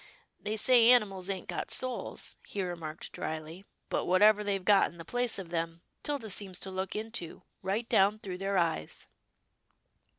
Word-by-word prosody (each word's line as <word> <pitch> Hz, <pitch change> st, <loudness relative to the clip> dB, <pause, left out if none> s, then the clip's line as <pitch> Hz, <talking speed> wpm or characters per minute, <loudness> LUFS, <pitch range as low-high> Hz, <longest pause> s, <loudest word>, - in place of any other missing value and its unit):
They 215 Hz, +1 st, -3 dB
say 235 Hz, +1 st, +6 dB
animals 200 Hz, -6 st, +4 dB
ain't 190 Hz, -2 st, -3 dB
got -, -, -3 dB
souls," 255 Hz, -1 st, -1 dB
he 200 Hz, -, -3 dB
remarked 165 Hz, -3 st, -5 dB
drily, 160 Hz, +4 st, -5 dB
" -, -, -46 dB
but -, -, 0 dB
whatever 210 Hz, +3 st, +5 dB
they've 195 Hz, -2 st, -1 dB
got 200 Hz, -1 st, +5 dB
in 170 Hz, -, -15 dB
the 165 Hz, -, -9 dB
place 245 Hz, +4 st, 0 dB
of 190 Hz, -4 st, -6 dB
them, 165 Hz, 0 st, -3 dB, 0.2 s
'Tilda 275 Hz, -8 st, -3 dB
seems 190 Hz, -2 st, -1 dB
to 190 Hz, -, -3 dB
look 190 Hz, 0 st, -3 dB
into, 215 Hz, -6 st, -4 dB, 0.2 s
right 210 Hz, +5 st, -1 dB
down 200 Hz, +2 st, +4 dB
through 185 Hz, -4 st, -6 dB
their 195 Hz, 0 st, 0 dB
eyes." 165 Hz, -, -1 dB
195 Hz, 170 wpm, -31 LUFS, 175-215 Hz, 0.2 s, say